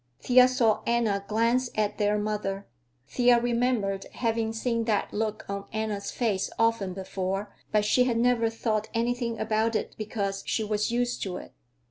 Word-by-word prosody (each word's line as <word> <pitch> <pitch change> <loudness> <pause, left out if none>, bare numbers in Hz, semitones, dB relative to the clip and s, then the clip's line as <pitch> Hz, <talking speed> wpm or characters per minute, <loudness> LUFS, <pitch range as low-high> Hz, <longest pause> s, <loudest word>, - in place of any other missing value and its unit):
Thea 250 0 +6
saw 235 -4 +2
Anna 225 -4 +1
glance 235 +3 +2
at 210 -1 -1
their 210 0 +2
mother. 205 -2 -2 0.4
Thea 245 - +4
remembered 235 -5 0
having 225 -2 0
seen 230 0 -1
that 215 -3 0
look 215 0 -2
on 200 0 -4
Anna's 215 -2 -3
face 210 -6 -1
often 225 -5 +1
before, 195 +1 -3 0.2
but 210 -1 +2
she 250 +4 +4
had 240 -2 +1
never 235 -1 +3
thought 220 -1 -2
anything 235 0 -1
about 220 +1 +1
it - - -2
because 200 -2 -2
she 220 - 0
was 210 0 0
used 245 +1 -1
to 185 -2 -3
it. - - -11
220 Hz, 160 wpm, -27 LUFS, 205-235 Hz, 0.4 s, Thea